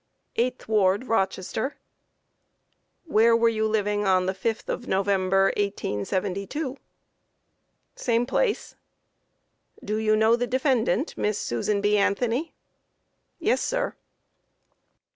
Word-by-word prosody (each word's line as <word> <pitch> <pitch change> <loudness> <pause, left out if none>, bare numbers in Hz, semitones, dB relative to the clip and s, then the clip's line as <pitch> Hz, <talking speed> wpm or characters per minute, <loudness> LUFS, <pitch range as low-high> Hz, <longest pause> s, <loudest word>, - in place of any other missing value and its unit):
8th 250 +2 -1
ward, 205 +2 +2
Rochester. 195 +3 -1 1.3
Q. 320 - -14
Where 230 +1 +5
were 230 0 +4
you 220 -1 0
living 210 -1 0
on 185 -1 +3
the 190 - 0
5th 215 +3 -3
of 245 - -4
November, 195 0 +2
1872? 200 - -2
A. 275 - -31
Same 235 0 +1
place. 425 - -1 1.1
Q. - - -15
Do 210 +1 -1
you 215 0 +2
know 220 +2 +4
the 245 +1 -2
defendant, 255 - +1
Miss 210 -1 0
Susan 200 - -1
B. 205 +1 +3
Anthony? 235 +8 +1 1.0
A. - - -8
Yes, - - +3
sir. - - -1
215 Hz, 120 wpm, -25 LUFS, 195-235 Hz, 1.3 s, Where